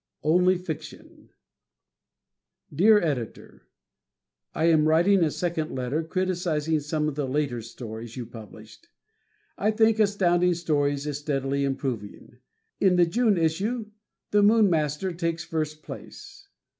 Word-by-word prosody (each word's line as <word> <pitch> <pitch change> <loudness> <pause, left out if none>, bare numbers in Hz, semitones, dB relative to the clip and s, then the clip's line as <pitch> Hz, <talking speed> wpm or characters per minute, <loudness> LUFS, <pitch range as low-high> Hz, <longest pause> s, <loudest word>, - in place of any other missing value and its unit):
Only 180 +4 +3
Fiction 175 -4 -9 1.4
Dear 210 +8 +5
Editor: 140 - -5 0.9
I 160 - +1
am 160 -2 +4
writing 175 +4 +4
a 160 - +2
second 160 -2 -3
letter 130 +5 -2
criticizing 160 -3 -1
some 150 +1 -2
of 155 - -2
the 145 -1 -3
later 135 -3 -1
stories 115 0 -9
you 125 - -4
published. 110 0 -13 0.7
I 210 - +2
think 220 0 +3
Astounding 180 -4 +2
Stories 145 -4 0
is 145 -1 -3
steadily 140 -1 -1
improving. 125 -4 -4 0.4
In 190 -2 +4
the 175 -1 +5
June 215 +3 +2
issue, 210 +8 -1 0.4
"The 205 - +4
Moon 210 -1 +5
Master" 155 +3 0
takes 165 -1 -2
first 155 -1 -4
place. - - -11
160 Hz, 125 wpm, -26 LUFS, 140-180 Hz, 1.4 s, Dear